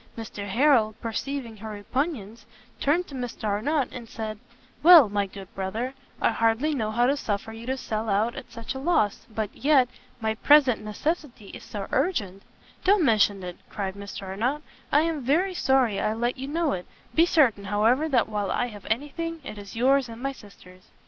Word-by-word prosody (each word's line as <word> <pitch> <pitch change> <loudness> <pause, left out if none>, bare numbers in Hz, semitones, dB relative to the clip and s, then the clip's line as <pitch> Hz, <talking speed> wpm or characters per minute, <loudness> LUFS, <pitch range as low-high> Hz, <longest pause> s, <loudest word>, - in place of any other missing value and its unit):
Mr 210 -2 -6
Harrel, 230 -1 +3
perceiving 235 0 -4
her 220 +2 -7
repugnance, 220 - -3 0.4
turned 330 +6 +2
to 290 - -13
Mr 245 -4 -6
Arnott, 240 +8 0
and 235 -3 -9
said, 215 -2 -5 0.4
"Well, 325 - +9
my 200 -1 0
good 195 0 -11
brother, 220 +7 -3 0.3
I - - +3
hardly 230 +7 +1
know 220 -6 -1
how 240 +3 +2
to 275 +3 +3
suffer 220 -4 -3
you 225 +2 -9
to 265 +1 -1
sell 220 -3 -3
out 210 +4 +1
at - - -9
such 230 +3 -6
a 265 - -6
loss, 270 - +1
but 215 -2 -4
yet, 275 -3 +4 0.3
my 220 -1 0
present 260 -2 +4
necessity 240 - -3
is - - -10
so 200 -2 -6
urgent 230 - 0 0.2
" - - -27
"Don't 385 -3 +4
mention 205 -5 +3
it," 180 -1 -6
cried 195 -2 -3
Mr 200 0 -8
Arnott, 235 +11 -2 0.3
"I 295 - +5
am 320 -2 -1
very 335 +10 +1
sorry 260 - +2
I 215 - +1
let 240 +2 -1
you 270 +1 -6
know 320 +1 0
it; 180 -1 -4 0.3
be 330 +2 +5
certain, 240 -12 +3
however, 225 +10 +2
that 250 -5 +3
while 210 -2 -2
I 245 - 0
have 205 -3 -11
anything, 295 +8 -2
it 215 - -7
is 200 +1 -10
yours 260 +2 +3
and 230 0 -9
my 275 +2 -2
sister's." 185 -6 -16
230 Hz, 190 wpm, -26 LUFS, 210-280 Hz, 0.4 s, Well